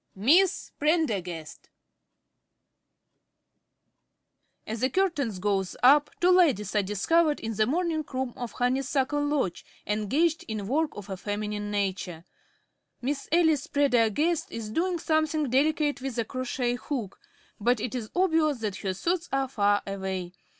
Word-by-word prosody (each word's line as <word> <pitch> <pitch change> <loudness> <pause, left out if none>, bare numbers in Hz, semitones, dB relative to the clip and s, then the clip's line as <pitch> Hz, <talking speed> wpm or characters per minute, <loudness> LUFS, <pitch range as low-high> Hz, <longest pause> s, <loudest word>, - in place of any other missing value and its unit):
"MISS 320 - +3
PRENDERGAST" 205 - -1 3.0
_As 220 +1 -4
the 260 - +1
curtain 335 -6 +1
goes 195 -2 -1
up 290 +3 +6
two 360 +1 +4
ladies 275 - +3
are 210 - +4
discovered 295 - +2
in 225 0 -4
the 215 +1 +1
morning 325 +2 0
room 260 -2 -2
of 245 -2 -6
Honeysuckle 265 +3 0
Lodge 290 - -1 0.2
engaged 270 - +1
in 215 -3 -4
work 305 +6 +1
of 205 -1 -8
a 190 - -4
feminine 210 +1 -3
nature._ 190 -5 -2 0.8
Miss 275 +2 -3
Alice 320 -4 +3
Prendergast 285 - +2
_is 215 -2 -6
doing 355 +4 0
something 315 -3 0
delicate 290 +1 +2
with 265 -2 -4
a 230 - 0
crochet 255 0 -2
hook, 225 -4 -5 0.4
but 240 +3 +2
it 230 +2 -3
is 235 -4 -4
obvious 320 -6 +2
that 210 -3 -2
her 190 -2 -3
thoughts 345 - -1
are 270 0 +1
far 205 -4 +1
away. 190 -2 -4
255 Hz, 135 wpm, -27 LUFS, 210-310 Hz, 3.0 s, up